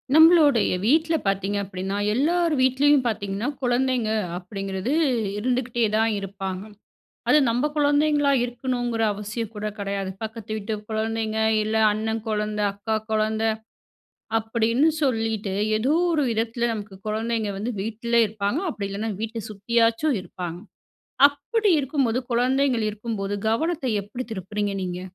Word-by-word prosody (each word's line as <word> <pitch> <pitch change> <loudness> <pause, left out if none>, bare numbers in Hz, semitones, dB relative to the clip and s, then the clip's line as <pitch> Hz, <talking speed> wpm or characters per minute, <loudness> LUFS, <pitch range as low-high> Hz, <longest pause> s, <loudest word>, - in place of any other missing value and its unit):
நம்மளுடைய 315 - +6
வீட்ல 320 +5 +3
பார்த்தீங்க 195 +1 0
அப்டின்னா 190 +1 -4 0.2
எல்லார் 335 +6 +2
வீட்லேயும் 265 +2 +4
பார்த்தீங்கன்னா, 200 0 -2 0.2
குழந்தைங்க 245 -2 +1 0.2
அப்டிங்கிறது 195 +4 -4 0.5
இருந்துக்கிட்டே 245 +1 0
தான் 225 +1 +3
இருப்பாங்க. 195 -1 -5 0.7
அது 300 - +6
நம்ப 245 +5 +1
குழந்தைங்களா 290 0 +3
இருக்கணுங்ற 245 -1 -2
அவசியம் 210 +2 -5
கூட 210 +1 -3
கடையாது. 200 -1 -3
பக்கத்து 220 -1 -5
வீட்டு 215 +1 -3 0.2
கொழந்தைங்க, 220 0 -1 0.2
இல்ல 215 +1 -1 0.2
அண்ணன் 220 +1 -2
கொழந்த, 210 0 -1
அக்கா 220 +2 -2 0.2
கொழந்த, 220 0 +1 0.9
அப்டின்னு 230 +6 +2
சொல்லிட்டு 225 -6 0 0.2
ஏதோ 260 +7 +1 0.2
ஒரு 300 -3 +2
விதத்துல, 230 +1 0
நமக்கு 205 -2 -7
கொழந்தைங்க 220 0 -1
வந்து 225 +5 -2
வீட்ல 230 +3 -3
இருப்பாங்க. 210 +6 -2
அப்டி 200 -5 -4
இல்லைனா 210 +3 -3
வீட்ட 225 +1 -4
சுத்தியாச்சும் 230 +5 +1
இருப்பாங்க. 175 -2 -6 0.7
அப்டி 385 +10 0
இருக்கும்போது 270 -4 0
குழந்தைங்க 255 +2 +2
இருக்கும்போது, 205 -2 -4
கவனத்த 315 +5 0 0.2
எப்டி 230 +6 -6
திருப்புறீங்க 205 +1 -3
நீங்க? 180 -1 -4
225 Hz, 120 wpm, -24 LUFS, 205-255 Hz, 0.9 s, நம்மளுடைய